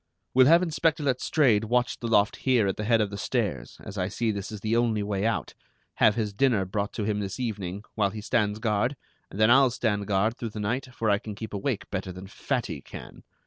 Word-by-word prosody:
We'll 130 0 +6
have 170 +3 +6
Inspector 160 -2 0
Letstrayed 130 -4 +2
watch 120 +2 0
the 120 - -4
loft 105 -2 +3
here 125 -5 +2
at 95 - 0
the 105 - -4
head 115 0 +3
of 105 -1 -1
the 100 - -6
stairs, 95 - -2
as 100 - -7
I 90 - 0
see 110 +3 -1
this 100 -1 -5
is 105 -2 -7
the 110 +2 0
only 115 -3 +1
way 100 +1 -1
out, 115 - -2 0.4
have 105 - +5
his 105 -3 -2
dinner 115 -4 +2
brought 100 +2 -2
to 110 - -3
him 105 0 -1
this 100 +1 -4
evening, 100 -5 -4
while 105 -3 +1
he 105 +2 -7
stands 105 -2 0
guard, 110 +4 0 0.3
and 100 - -9
then 110 +2 +5
I'll 135 +1 +6
stand 105 -5 -1
guard 105 +3 +1
through 115 - -4
the 105 - -7
night, 120 +6 -2
for 115 -3 0
I 100 - +2
can 105 -1 -7
keep 110 +1 -7
awake 105 +2 -2
better 95 -1 -3
than 90 +1 -9
Fatty 110 - -3
can. - - -11
110 Hz, 230 wpm, -27 LUFS, 100-120 Hz, 0.4 s, We'll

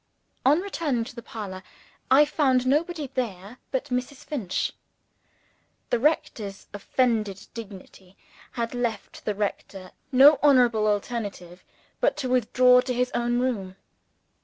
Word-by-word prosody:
On 295 +6 +4
returning 320 -11 -2
to 235 - -10
the 235 - -7
parlor, 200 -5 -7 0.5
I 275 +3 +7
found 270 -4 +2
nobody 300 +1 0
there 220 -2 -4
but 275 +2 -3
Mrs. 250 +2 -3
Finch. 220 -12 -2 1.2
The 240 - +2
rector's 240 -8 -1
offended 210 -2 -1
dignity 195 -3 -11 0.4
had 235 -1 -3
left 235 -4 -4
the 210 - -1
rector 195 -2 -4 0.2
no 280 +3 +7
honorable 245 -7 +4
alternative 205 -4 -3 0.4
but - - +1
to 255 - -3
withdraw 250 +1 +4
to 250 0 -3
his 250 +1 0
own 240 0 0
room. 200 -8 -2
240 Hz, 125 wpm, -25 LUFS, 205-260 Hz, 1.2 s, I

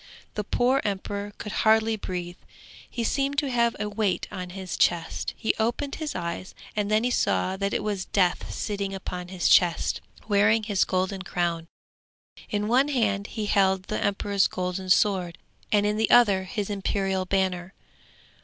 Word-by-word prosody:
The 210 - -2
poor 250 +6 +2
emperor 200 0 -3
could 210 - -6
hardly 220 +1 +3
breathe, 180 -3 -5 0.5
he 235 - -3
seemed 275 +3 0
to 280 -2 +1
have 235 -1 +2
a 210 - -1
weight 205 -2 -1
on 185 -3 -5
his 185 0 -5
chest, 170 -2 0
he 220 - +1
opened 240 +5 -1
his 305 -1 -3
eyes, 170 +2 -4 0.2
and 205 -1 0
then 215 +1 +3
he 250 - +1
saw 190 -5 +1
that 200 0 -1
it - - -1
was 205 -3 -2
Death 180 -3 +1
sitting 200 -2 -3
upon 180 -2 -6
his 180 -1 -1
chest, 175 -3 +3 0.3
wearing 215 +1 +3
his 205 -3 +1
golden 190 +1 -1
crown. 170 -3 -2 0.8
In 210 0 -1
one 255 +5 +4
hand 210 -8 0
he 215 - -4
held 190 -2 +2
the 215 - -3
emperor's 200 -1 +1
golden 185 +1 -4
sword, 185 -3 +2 0.3
and 205 -1 +3
in 210 +1 +1
the 220 - +1
other 205 -6 +5
his 205 +1 -3
imperial 195 -1 -1
banner. 185 -1 -1
200 Hz, 165 wpm, -26 LUFS, 185-220 Hz, 0.8 s, other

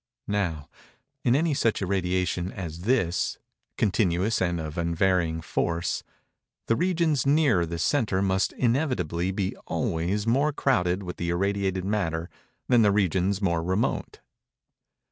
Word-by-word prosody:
Now, 85 -8 -1 0.6
in 120 - +3
any 160 +2 +2
such 115 -5 +1
irradiation 90 -1 -1
as 85 -2 -7
this—continuous 100 -2 0
and 85 -2 0
of 80 -1 -5
unvarying 85 -1 +1
force—the 85 +7 -3
regions 170 -5 +1
nearer 140 - +3
the 85 +1 -4
centre 105 - +1
must 95 0 +1
inevitably 120 - 0
be 95 0 -2
always 90 +6 -1
more 140 +6 +2
crowded 95 -10 +1
with 90 -1 -6
the 85 - -2
irradiated 95 +1 0
matter 85 -5 -1 0.4
than 120 -2 +5
the 105 -2 +5
regions 95 0 +1
more 85 -3 +1
remote. 95 +6 -1
95 Hz, 120 wpm, -26 LUFS, 85-115 Hz, 0.6 s, than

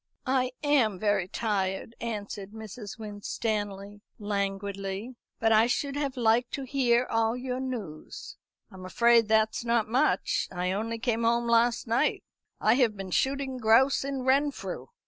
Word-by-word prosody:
"I 255 -1 +1
am 260 -9 +3
very 205 -2 +1
tired," 195 0 -2
answered 205 -3 -5
Mrs. 220 -1 -8
Winstanley 205 -1 -4 0.2
languidly; 200 +2 -3 0.2
"but 225 0 +2
I 220 +1 +5
should 280 +3 -1
have 280 -2 -2
liked 235 +1 +2
to 275 - -3
hear 250 -2 +2
all 225 0 0
your 250 0 -3
news." 225 -13 -6 0.4
"I'm 190 -1 -11
afraid 235 +4 +4
that's 220 +1 +2
not 235 -2 +1
much. 260 +7 +1
I 180 0 -2
only 225 +4 -2
came 235 -1 -1
home 235 +1 +2
last 235 0 +3
night; 240 +6 +1 0.4
I 215 - +4
have 230 -6 +2
been 195 -1 -6
shooting 270 +3 0
grouse 245 +5 +4
in 275 -1 -3
Renfrew." 275 +2 0
225 Hz, 145 wpm, -28 LUFS, 205-250 Hz, 0.4 s, I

